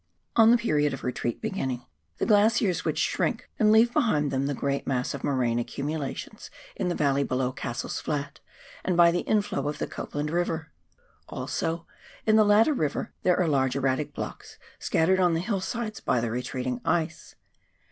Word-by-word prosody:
On 225 -1 +7
the 240 - +7
period 150 - +1
of - - -12
retreat 125 - -3
beginning, 135 - -3 0.3
the - - 0
glaciers 210 -3 +3
would - - -1
shrink - - -1
and 215 -2 +5
leave 230 +2 +5
behind 155 - +2
them 135 0 0
the 145 - -1
great 140 +2 -2
mass 125 -2 -1
of - - -6
morainic 120 -4 0
accumu 145 +5 -3
lations 140 -2 -6 0.3
in - - -1
the 175 - -1
valley 140 -1 +2
below 130 -1 -1
Cassell's 120 -2 -4
Flat, 145 -1 -3 0.4
and 180 -2 0
by 170 -1 +7
the 175 - 0
inflow 205 -10 0
of 150 - -3
the - - -2
Copland 150 +1 -4
Eiver. 165 -2 -1 0.6
Also 165 +1 -3 0.4
in 215 - +4
the 220 - +7
latter 210 +8 +5
river 155 - -2
there 180 -1 +2
are 180 - +2
large 130 -4 +1
erratic 135 +2 0
blocks - - -7 0.2
scattered 185 +4 +2
on 175 -2 +3
the - - +1
hillsides 210 +3 -3
by 125 - +1
the 115 -1 -2
retreating 125 0 -3
ice. 160 -2 -1
155 Hz, 180 wpm, -27 LUFS, 135-200 Hz, 0.6 s, On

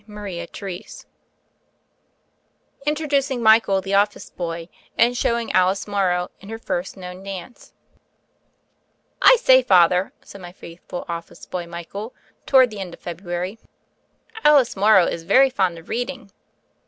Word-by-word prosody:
CHAPTER 200 -1 -7
III 180 -2 -6 2.0
INTRODUCING 280 -4 0
MICHAEL, 220 -3 +5
THE 195 +1 -4
OFFICE 205 +1 +1
BOY, 165 -1 -5 0.3
AND 240 +1 +3
SHOWING 235 -1 -1
ALICE 185 +2 +2
MORROW 185 -3 0
IN 195 - -13
HER 225 - -5
FIRST 190 -4 -4
KNOWN 180 0 -9
DANCE 195 +3 -9 1.5
1SAY, 260 - +6
Father," 180 -3 +4
said 200 - -13
my 175 -1 -9
faithful 175 0 -9
office 170 0 -7
boy, 175 -2 -5
Michael, 175 +7 -8 0.3
toward 260 -3 +5
the 210 - -8
end 180 -3 -6
of - - -30
February, 175 +4 -5 0.8
"Alice 290 -4 +5
Morrow 200 -2 +5
is 170 - -3
very 260 +11 +4
fond 185 -7 0
of 165 - -14
reading." 245 -3 -4
195 Hz, 130 wpm, -22 LUFS, 180-235 Hz, 2.0 s, 1SAY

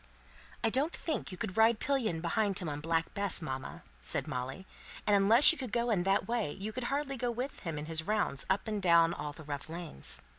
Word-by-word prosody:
"I 225 - +2
don't 285 +8 +1
think 315 - -3
you 185 - -7
could 185 +3 -4
ride 225 0 +5
pillion 230 -12 0
behind 195 +3 0
him 180 - -3
on 145 -1 -3
Black 165 +1 -1
Bess, 200 -1 +1
mamma," 135 -5 -6 0.2
said - - +3
Molly. 130 +9 -4 0.4
"And 205 - +4
unless 215 +7 +7
you 330 - -5
could 255 -5 -5
do 235 0 +1
that, 195 +1 0
you 210 +3 -5
could 255 0 -4
hardly 275 0 -2
go 245 0 -1
with 250 +4 -4
him 165 -4 -4
in 150 - -4
his 160 0 +1
rounds 205 -10 0
up 190 +3 +1
and 210 -2 -2
down 170 -2 +5
all 150 -3 -5
the 155 - -11
rough 145 +1 -6
lanes." 165 - -3
195 Hz, 215 wpm, -32 LUFS, 165-235 Hz, 0.4 s, unless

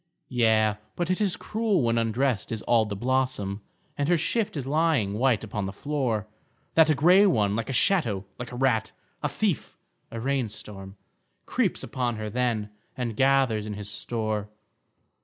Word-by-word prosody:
Yea, 110 -4 +3 0.2
but 175 0 -1
it 185 - 0
is 195 -3 +2
cruel 215 - 0
when 115 0 +2
undressed 115 0 0
is 110 -1 -3
all 115 -2 +3
the 105 -1 -4
blossom, 120 -4 -1 0.3
And 145 +1 -1
her 175 - +4
shift 200 +3 -1
is 135 - -3
lying 145 -8 +1
white 120 0 +2
upon 105 -2 -3
the - - -4
floor, 125 -3 -2 0.5
That 160 -1 +6
a 155 - +4
grey 180 +8 +6
one, 105 - +2
like 115 +3 -3
a - - -2
shadow, 120 - +2
like 125 -1 -6
a - - -7
rat, 120 -4 +1 0.3
a - - 0
thief, - - -2 0.3
a 115 - -6
rain 130 -1 0
storm 95 -1 -10 0.5
Creeps - - 0
upon 120 -2 -2
her 110 -1 -5
then 115 -3 -1 0.3
and 120 -3 -3
gathers 130 -5 +2
in 105 - -4
his 105 0 -6
store. 105 -1 -3
120 Hz, 175 wpm, -26 LUFS, 105-140 Hz, 0.5 s, That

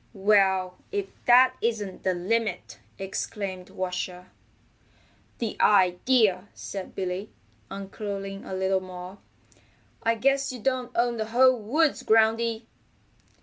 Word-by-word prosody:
"Well, 190 -3 +2
if 405 -1 -1 0.2
that 255 +1 +7
isn't 215 -5 -2
the 185 -1 0
limit!" 200 +2 -2 0.2
exclaimed 190 -1 -5
Washer. 180 0 -5 1.1
"The 230 -3 -3
idea!" 200 +1 +3
said 195 -2 -7
Billy, 185 +2 -3 0.4
uncurling 195 0 -6
a 190 - -6
little 190 0 +1
more. 185 +1 -9 0.8
"I 230 0 +2
guess 275 +3 +1
you 250 - -7
don't 255 +1 -1
own 240 0 +1
the 220 - -2
whole 255 +3 +5
woods, 275 +8 +1
Groundy." 225 +1 +2
205 Hz, 110 wpm, -26 LUFS, 190-235 Hz, 1.1 s, that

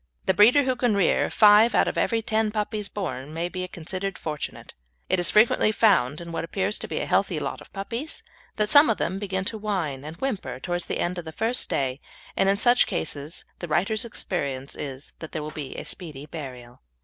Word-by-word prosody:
The 190 - +3
breeder 235 +9 +6
who 260 -1 +1
can 240 -4 +1
rear 195 - +2
five 215 +2 +6
out - - +4
of - - -2
every 230 -1 +1
ten 220 -1 +1
puppies 210 -1 -2
born 155 -7 -5
may 170 +2 -2
be 185 0 -4
considered 185 +3 -4
fortunate. 150 -2 -6 0.4
It 185 - +2
is 175 - +4
frequently 215 0 +4
found 170 - +3
in 170 0 -8
what 165 - -3
appears 195 +4 -1
to - - -5
be - - -3
a - - -2
healthy - - +1
lot - - -4
of - - -15
puppies 230 +10 -5 0.3
that 210 -1 +1
some 290 +1 +7
of 225 - +2
them 190 +3 -2
begin 190 -2 -2
to 220 +2 -2
whine 175 -11 -2
and 155 +2 -7
whimper 230 - -3
towards 175 +4 -3
the - - -2
end 175 +1 -1
of 170 - -8
the 160 - -6
first 230 +9 0
day, 135 0 -1 0.3
and 195 - +3
in 200 - +3
such 240 +3 +4
cases 155 -4 -4
the 175 - -5
writer's 195 +7 +1
experience 140 - -3
is 135 -1 -7
that 160 - -9
there 155 - -3
will 155 - -5
be 150 -4 -6
a - - -6
speedy 150 -6 -7
burial. 125 -6 -9
185 Hz, 215 wpm, -25 LUFS, 155-215 Hz, 0.4 s, some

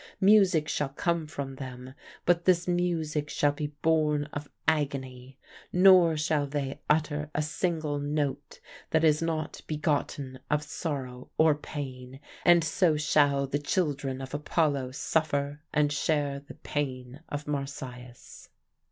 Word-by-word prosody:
Music 190 -6 +5
shall 145 -2 -1
come 165 +3 -1
from 135 -2 -6
them, 130 -1 -8 0.3
but 175 -1 +3
this 180 -1 +3
music 165 -4 0
shall 145 - +2
be 145 +1 -3 0.2
born 155 -2 +3
of 145 0 -5 0.2
agony; 135 -4 -1 0.3
nor 180 -3 +6
shall 150 -1 +1
they 140 0 -3
utter 150 -1 +1
a 150 - +2
single 155 -2 -1
note 145 -1 -2 0.3
that 160 0 +2
is 155 -1 +4
not 160 -2 -2
begotten 145 -3 -2
of 150 0 +1
sorrow 135 -6 -5
or 160 -1 +5
pain. 135 -3 -7 0.2
And 175 -1 +6
so 155 +1 +2
shall 145 -2 +3
the 135 +2 -2
children 145 -4 -1
of 135 +1 -8
Apollo 145 -3 0
suffer 145 -1 -1
and 150 -1 +2
share 145 -2 0
the 140 - -13
pain 130 -2 -4
of 145 +1 -4
Marsyas. 130 -4 -6
145 Hz, 135 wpm, -28 LUFS, 140-155 Hz, 0.3 s, nor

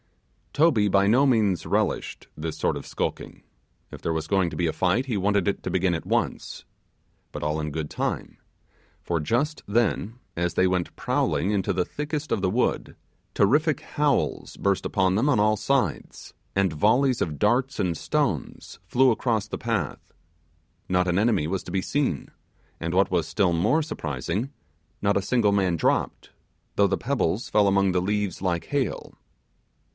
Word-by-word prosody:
Toby 135 -10 +3
by 100 +1 +3
no 125 +7 +4
means 105 -8 +2
relished - - -1
this 80 0 -5
sort - - 0
of - - -7
skulking; - - -4 0.5
if - - -10
there 85 - -1
was 80 -1 -2
going 95 -3 +2
to - - -7
be 85 - +1
a 80 - -1
fight, 95 +8 +1
he 125 -5 -2
wanted 100 -1 +1
it 100 - -1
to - - -3
begin 95 -1 +1
at 80 - -4
once. - - -2 0.7
But - - -6
all 75 +1 -1
in 75 0 -3
good 75 0 -4
time, - - -3 0.6
for 85 -1 -1
just 135 - 0
then, 110 0 0 0.2
as 85 0 -1
they 95 - +4
went 90 -1 -1
prowling 95 - 0
into 100 -3 0
the 90 -1 0
thickest 150 0 -4
of 100 - 0
the 95 - +1
wood, 120 +6 -1 0.4
terrific 145 +9 +3
howls 145 -1 -1
burst 100 -1 0
upon 95 -2 +1
them 125 +8 +2
on 125 -7 +3
all 110 +1 +3
sides, 110 - -2 0.2
and 95 -4 +2
volleys 120 - +2
of 75 -4 -2
darts 125 +6 +1
and 90 -3 0
stones - - -2
flew 130 +3 +4
across 115 -2 0
the - - -5
path. - - -3 0.8
Not 90 0 +2
an 90 +1 +2
enemy 105 -8 +2
was 95 +2 -2
to - - -9
be 95 +1 0
seen, 130 - -1 0.5
and 85 0 -3
what 95 +1 +3
was 85 -3 +1
still 90 +1 +1
more 150 - +2
surprising, 85 - -3 0.5
not 100 0 +2
a 100 - +2
single 110 0 +2
man 95 -4 +1
dropped, - - -1 0.4
though 100 - +4
the 95 0 0
pebbles 120 -5 -1
fell 105 -1 +3
among 100 -1 +3
the 90 - +2
leaves 100 -1 -1
like 90 -3 -1
hail. 140 -3 -2
100 Hz, 175 wpm, -25 LUFS, 90-120 Hz, 0.8 s, no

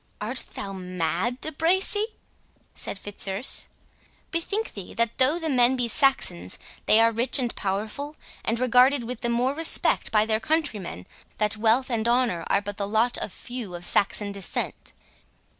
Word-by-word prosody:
"Art 235 +4 -4
thou 195 -1 -5
mad, 185 +5 -3
De 315 - -3
Bracy?" 380 +7 +3 0.7
said - - -3
Fitzurse. 200 +3 0 0.6
"Bethink 400 +6 -2
thee 195 -3 -9
that, 230 0 -1
though 265 +6 +6
the 325 -2 -4
men 255 -3 +3
be 245 -2 -1
Saxons, 230 - +1 0.3
they 215 - +6
are 230 0 +4
rich 230 +3 +4
and 245 -3 -2
powerful, 215 +10 -4 0.3
and 230 +1 -1
regarded 255 +2 +4
with 240 0 -7
the 240 - -1
more 245 +3 0
respect 325 +2 +3
by 215 -1 +3
their 220 0 +1
countrymen, 220 - -2 0.3
that 210 0 0
wealth 230 +4 +1
and 230 -1 -1
honour 240 -8 +1
are 200 - +1
but 205 0 -6
the 200 - -2
lot 225 +4 +1
of - - -5
few 240 -6 -7
of 175 0 -3
Saxon 205 +1 +2
descent." 200 -1 -2
230 Hz, 160 wpm, -25 LUFS, 205-260 Hz, 0.7 s, though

